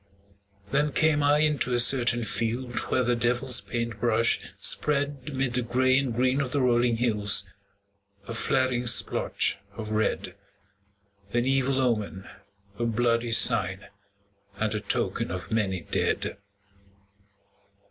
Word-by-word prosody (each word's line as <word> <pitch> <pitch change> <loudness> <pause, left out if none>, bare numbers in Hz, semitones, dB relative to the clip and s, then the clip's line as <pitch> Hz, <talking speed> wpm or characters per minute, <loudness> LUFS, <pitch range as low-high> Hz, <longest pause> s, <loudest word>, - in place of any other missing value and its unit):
Then 145 +1 +1
came 155 0 +2
I 145 +1 +3
into 150 -5 +1
a - - +1
certain 120 -1 +3
field 120 +2 -2
Where 130 - +1
the 120 0 +1
devil's 120 +2 +2
paint 115 -3 -4
brush 115 0 +2 0.2
spread 145 -1 0
'Mid 135 -2 -1
the 125 - 0
gray 130 +2 +1
and 135 -3 -2
green 130 +4 +1
of 130 -3 -3
the 145 - 0
rolling 120 -2 +2
hills 105 -4 +2 0.8
A 115 - -5
flaring 125 +1 0
splotch 110 -3 +2 0.2
of 110 -1 -6
red, 110 0 -1 1.0
An 120 0 +1
evil 135 0 +1
omen, 105 -6 -2 0.5
a 120 - 0
bloody 115 0 0
sign, 100 -5 +2 0.7
And 110 +1 -2
a 105 - -2
token - - -2
of 90 -2 -6
many 100 -5 -1
dead. - - -2
120 Hz, 130 wpm, -26 LUFS, 115-130 Hz, 1.0 s, I